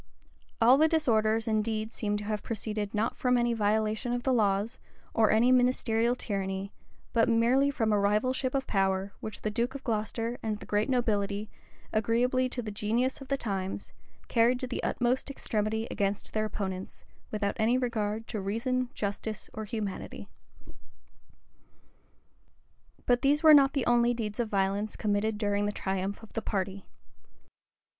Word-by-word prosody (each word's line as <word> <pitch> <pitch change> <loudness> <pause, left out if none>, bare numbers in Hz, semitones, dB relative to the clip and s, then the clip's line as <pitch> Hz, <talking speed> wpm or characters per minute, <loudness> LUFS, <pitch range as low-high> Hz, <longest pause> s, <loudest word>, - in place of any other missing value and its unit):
All 245 +4 +6
the 315 - +6
disorders 225 -8 +2
indeed 220 0 -1
seem 210 -1 -1
to 205 - -5
have 210 0 -2
proceeded 215 -2 -3
not 220 +2 0
from 250 -1 +2
any 240 0 +2
violation 215 +2 0
of 245 0 -2
the 265 - +2
laws, 210 0 +1 0.3
or 220 -1 +4
any 235 +3 +4
ministerial 245 -2 +2
tyranny, 195 -3 -3 0.4
but 230 -1 +3
merely 240 +5 +3
from 225 -6 0
a 205 - +3
rivalship 255 +6 +1
of 270 -1 0
power, 195 0 0
which 215 - -7
the 215 - -1
duke 240 +5 -1
of 275 - -7
Glocester 230 +1 -2
and 215 -1 -2
the - - -11
great 210 +4 0
nobility, 210 -4 0 0.4
agreeably 245 +4 +2
to 245 -1 -3
the 215 - -5
genius 235 +7 0
of 270 - -9
the 275 - 0
times, 195 -5 -4 0.3
carried 240 +1 +3
to - - -1
the 250 - -4
utmost 245 +3 0
extremity 220 -4 -2
against 200 0 -2
their 215 0 +1
opponents, 190 -3 -5 0.2
without 205 -1 -1
any 230 +3 +3
regard 225 -3 -2
to 215 -4 -3
reason, 240 +5 -1
justice, 205 +1 -4
or 220 - -5
humanity. 210 -3 -5 2.8
But 245 0 +3
these 290 +3 +3
were 310 -1 +9
not 275 -2 +6
the 275 -4 0
only 240 0 +3
deeds 215 -2 -4
of 235 -2 0
violence 200 +1 0
committed 210 0 0
during 205 -1 0
the - - 0
triumph 195 +1 -3
of 220 - -14
the 225 - -2
party. 195 -2 -3
220 Hz, 160 wpm, -29 LUFS, 205-245 Hz, 2.8 s, were